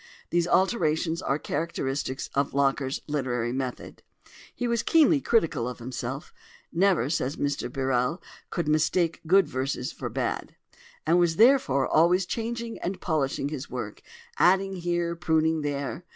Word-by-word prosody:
These 175 0 +2
alterations 170 -4 +1
are 135 - 0
characteristic 140 -5 -3
of 140 0 0
Locker's 135 -1 +1
literary 125 -5 -1
method. 130 -1 -5 0.5
He 245 - -2
was 235 -1 +1
keenly 315 -3 +4
critical 165 - +1
of 125 - -7
himself—"never," 135 +6 -2
says 145 -2 -1
Mr 145 -4 -2
Birrell, 130 +4 0 0.3
"could 170 -4 -2
mistake 160 +2 +1
good 190 0 +5
verses 130 -2 -2
for - - -5
bad"—and 170 +3 -3
was 170 -2 +2
therefore 220 - +4
always 175 +4 +4
changing 235 +3 -4
and 185 +1 -3
polishing 140 -3 -1
his 145 -2 -6
work, - - -6 0.4
adding 195 0 +3
here, 175 -1 -1
pruning 160 -1 +1
there. 145 +3 -3
160 Hz, 130 wpm, -27 LUFS, 135-180 Hz, 0.5 s, good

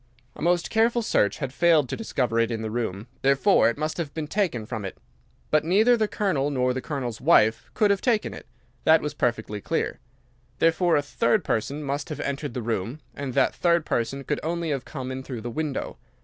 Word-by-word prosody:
A - - -11
most 175 +1 +1
careful 230 +1 +2
search 105 - +2
had 130 -2 -4
failed 160 -3 +4
to - - -2
discover 125 - -1
it 115 - +2
in 115 -2 -3
the 110 - -3
room. 110 -3 -3 0.2
Therefore 140 - +4
it 120 - -3
must 155 +1 -2
have 160 -5 -4
been 160 -2 -2
taken 150 - -1
from 110 -2 -5
it. 95 - -6 0.5
But 155 - +4
neither 210 +9 +4
the 220 -2 +1
Colonel 170 -11 0
nor 125 -2 +1
the 130 - -3
Colonel's 125 -4 -4
wife 115 -7 +4
could 210 -2 +4
have 200 - +1
taken 230 -4 +1
it. - - -11 0.4
That 160 0 +5
was 150 0 -3
perfectly 110 -6 -1
clear. - - -2 0.6
Therefore 165 +1 +3
a 145 - +2
third 210 +7 +1
person 140 +7 -2
must 140 0 -3
have - - -5
entered 140 -2 -3
the 125 - -3
room. 115 +4 -2
And 135 -2 -5
that - - +3
third 170 -2 +2
person 135 +4 -1
could 150 - -2
only 170 0 -2
have 135 -3 -2
come 130 -3 -6
in 130 0 -4
through 130 -3 -6
the 120 +2 -5
window. 150 +1 -3
140 Hz, 210 wpm, -25 LUFS, 120-170 Hz, 0.6 s, That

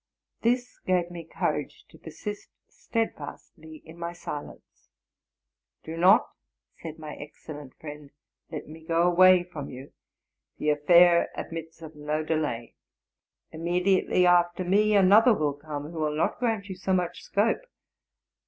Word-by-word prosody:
This 245 +1 0
gave 180 -2 0
me 170 -2 -8
courage - - -3
to - - -17
persist 205 -1 -7 0.2
steadfastly 160 -8 -6
in 160 +2 -13
my 170 0 -4
silence. 150 -4 -9 0.5
'* - - -61
Do 160 - -6
not,'' 185 +7 +5 0.5
said 160 -1 -7
my 155 -1 -8
excellent 145 -2 -10
friend, 150 -2 -10 0.2
'' - - -58
let 155 - -6
me 160 +2 -11
go 165 +1 +1
away 180 +1 +6
from 160 -5 -8
you; 130 +2 -10 0.6
the 150 - +1
affair 170 +3 +5
admits 165 0 -7
of 160 0 -10
no 150 +1 -2
delay; 150 -7 -2 0.8
immediately 180 +3 +1
after 175 0 +3
me 210 +4 +3
another 210 +5 +6
will 150 -4 0
come, 145 +1 -7
who. 165 - -6
will 150 -1 -1
not 160 - 0
grant 225 -5 -1
you 190 - -5
so 190 +1 -2
much 180 -2 -1
scope. 210 - +1
170 Hz, 145 wpm, -27 LUFS, 155-185 Hz, 0.8 s, away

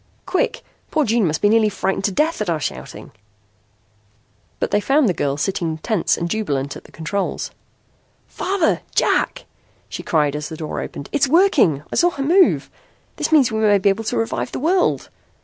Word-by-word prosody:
Quick. - - -1 0.3
Poor 310 -2 +1
June 225 -3 +2
must 155 0 -2
be 205 - +5
nearly 220 0 +4
frightened 195 -1 -2
to 205 - +1
death 305 - 0
at 210 - -1
our 165 -2 0
shouting." - - -6 1.5
But - - -1
they 205 - +3
found 275 +3 +3
the 185 - +2
girl 140 -3 -1
sitting 165 -1 -2
tense 200 +1 0
and 170 - -2
jubilant 145 -9 -2
at - - -11
the - - -17
controls. 175 +5 -3 0.8
"Father! 375 -4 0
Jack!" - - +1 0.4
she - - -6
cried 150 -3 +1
as 150 0 -4
the 160 - -7
door 155 -1 -4
opened. 140 - -7
"It's 285 -1 +2
working. 275 - +3
I - - -1
saw 350 - +5
her 280 -5 -4
move. 355 +6 +3 0.5
That - - -2
means 275 -6 +5
we 220 - -1
may 210 -2 +4
be 200 +1 +2
able 220 +3 -1
to 210 - -1
revive 115 +2 -2
the - - -4
world!" 350 +6 +1
205 Hz, 185 wpm, -20 LUFS, -, 1.5 s, be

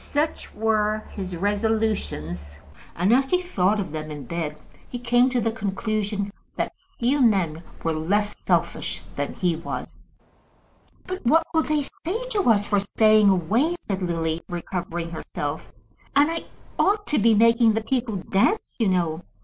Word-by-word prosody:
Such 300 +2 -2
were 215 0 +1
his 185 -3 -5
resolutions, 200 - -1 0.4
and, 185 +6 +3
as 265 +2 +3
he 360 - +3
thought 210 - +1
of 190 - -3
them 155 0 -5
in 150 -2 -6
bed, 160 -3 -3 0.3
he 245 - -4
came 245 +1 +3
to 250 -1 +1
the 225 0 0
conclusion 205 -1 -2 0.2
that - - -2 0.2
few 265 +4 +2
men 185 -9 +2 0.2
were 165 - +1
less 205 +7 0
selfish - - -1
than - - -2
he 180 -5 +1
was. 165 +2 -7 1.0
"But 370 +1 -5
what 320 +7 +4
will 320 - +4
they 305 -2 0
say 420 - -4
to 405 - +2
us 205 -2 +4
for 205 -1 +2
staying 215 +1 +4
away?" 215 - +2
said 195 - -4
Lily, 165 -2 -1
recovering 175 -1 -4
herself. 150 -2 -5 0.4
"And 290 +3 +5
I 330 - -4 0.3
ought 415 +1 +3
to 300 - +1
be 225 +1 +5
making 230 +1 +5
the 225 0 -1
people 245 -3 -1
dance, 195 - 0
you 225 - +3
know. 175 -3 +1
210 Hz, 155 wpm, -24 LUFS, 175-245 Hz, 1.0 s, And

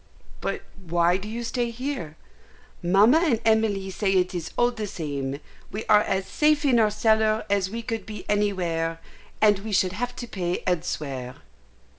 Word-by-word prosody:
"But - - -3 0.2
why 175 +2 +3
do 200 +2 -7
you 235 +2 -4
stay 240 0 -1
here?" 235 - -5 0.6
"Mamma 200 - +5
and 300 -10 +2
Emily 215 -3 +2
say 195 +1 0
it 185 0 +2
is 170 -2 -4
all 240 0 +3
the 220 -3 -5
same. 140 -6 -4 0.3
We 215 +2 -5
are 210 -1 +6
as 190 -2 -1
safe 300 +3 +2
in 250 -4 +4
our 215 -1 +4
cellar 220 0 +2
as 195 -2 +2
we 230 +3 -5
could 225 0 -4
be 210 -2 -7
anywhere, 175 -6 0 0.4
and 210 -2 +5
we 215 +2 -6
should 185 -2 +2
have 245 +5 -3
to 240 - -6
pay 180 -5 -3
elsewhere." 140 -7 -2
205 Hz, 170 wpm, -25 LUFS, 180-225 Hz, 0.6 s, are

